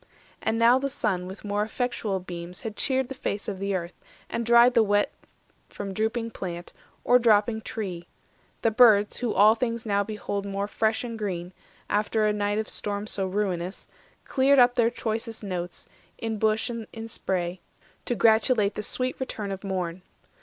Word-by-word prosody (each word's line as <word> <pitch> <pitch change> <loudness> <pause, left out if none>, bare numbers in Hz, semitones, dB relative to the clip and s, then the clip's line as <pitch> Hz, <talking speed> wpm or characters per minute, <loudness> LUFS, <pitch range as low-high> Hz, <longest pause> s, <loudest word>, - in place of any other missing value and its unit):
And 225 - 0
now 235 +3 +5
the 275 +1 -1
sun 180 -8 -1
with 190 +3 -9
more 205 0 0
effectual 220 -3 -2
beams 175 -1 -8
Had 220 -2 -5
cheered 260 +1 +1
the 270 - -6
face 210 -5 -4
of 195 -2 -4
earth, 185 -3 -2 0.4
and 235 - -1
dried 235 +1 +6
the 230 - +5
wet 205 -1 +2 0.6
From 195 -1 -6
drooping 225 +3 -1
plant, 175 -4 -6 0.3
or 250 +1 +5
dropping 220 -1 +3
tree; 185 -7 -5 0.6
the 225 - +3
birds, 215 -3 +5
Who 245 -3 -1
all 210 +3 +7
things 230 -1 -2
now 200 -1 +2
behold 205 -1 -4
more 200 0 -3
fresh 220 +2 0
and 230 -2 -5
green, 180 -3 -4 0.3
After 215 +1 +1
a 210 - +2
night 205 0 0
of 220 - -1
storm 205 0 -4
so 195 -3 -2
ruinous, 185 -2 -2 0.4
Cleared 275 +1 +3
up 245 -1 +6
their 235 -2 +3
choicest 225 -1 -4
notes 180 -3 -5 0.3
in 225 -2 -3
bush 220 +3 +1
and 230 -2 -6 0.2
spray, 180 -4 -2 0.4
To 240 - 0
gratulate 220 -2 +4
the - - -4
sweet 255 +4 -2
return 215 -6 -4
of 195 0 -6
morn. 185 -2 -3
210 Hz, 170 wpm, -26 LUFS, 195-230 Hz, 0.6 s, all